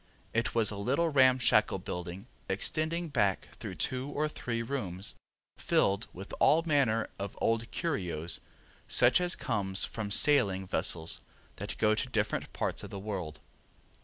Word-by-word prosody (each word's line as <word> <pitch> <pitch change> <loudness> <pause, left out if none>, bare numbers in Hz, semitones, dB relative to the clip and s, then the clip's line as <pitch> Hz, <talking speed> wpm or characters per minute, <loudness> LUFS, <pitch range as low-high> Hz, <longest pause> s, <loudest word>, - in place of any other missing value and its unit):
It 115 +1 -1
was 110 -2 +3
a 105 - -5
little 140 +11 +1
ramshackle 130 -4 +4
building 90 +3 -6 0.2
extending 160 - +1
back 100 -9 0
through - - -6
two 130 +2 -2
or 150 +1 -1
three 115 -6 -4
rooms 100 -7 -2 0.5
filled 100 +3 +1
with 95 +3 -10
all 160 +2 +5
manner 135 -8 +2
of 100 0 -5
old 115 0 0
curios 90 - -2 0.5
such 125 +8 +4
as 180 0 +3
comes 100 -5 +1
from 110 -2 -5
sailing 100 -6 +4
vessels 85 -3 +1 0.4
that - - -6
go 105 -1 +3
to 110 +4 -2
different 110 -3 -1
parts - - -2
of - - -7
the 100 - -7
world. 95 -6 -5
110 Hz, 145 wpm, -30 LUFS, 95-140 Hz, 0.5 s, all